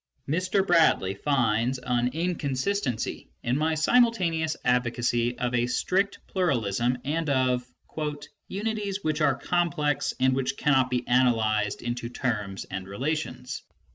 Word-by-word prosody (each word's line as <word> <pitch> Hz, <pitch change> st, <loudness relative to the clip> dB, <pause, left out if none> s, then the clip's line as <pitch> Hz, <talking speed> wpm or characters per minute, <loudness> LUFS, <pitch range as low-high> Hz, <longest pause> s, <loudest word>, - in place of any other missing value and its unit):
Mr. 185 Hz, +6 st, +1 dB
Bradley 160 Hz, -, +4 dB
finds 120 Hz, +1 st, +1 dB
an 125 Hz, -1 st, 0 dB
inconsistency 155 Hz, -, -2 dB
in 120 Hz, -, +1 dB
my 155 Hz, +2 st, +1 dB
simultaneous 165 Hz, -5 st, +2 dB
advocacy 120 Hz, -1 st, +1 dB
of 125 Hz, 0 st, -1 dB
a 120 Hz, 0 st, +2 dB
strict 195 Hz, +10 st, 0 dB
pluralism 125 Hz, -, 0 dB
and 155 Hz, +2 st, -1 dB
of 130 Hz, -2 st, +2 dB, 0.4 s
" 145 Hz, 0 st, -9 dB
unities 205 Hz, -1 st, -3 dB
which 155 Hz, 0 st, 0 dB
are 140 Hz, -3 st, +4 dB
complex 150 Hz, -1 st, 0 dB
and 130 Hz, 0 st, +3 dB
which 130 Hz, -1 st, -1 dB
cannot 135 Hz, -3 st, +3 dB
be 125 Hz, -1 st, 0 dB
analysed 110 Hz, -4 st, +2 dB
into 120 Hz, 0 st, -3 dB
terms 105 Hz, -6 st, -3 dB
and 95 Hz, 0 st, -6 dB
relations 150 Hz, +10 st, -3 dB
130 Hz, 125 wpm, -27 LUFS, 120-160 Hz, 0.4 s, Bradley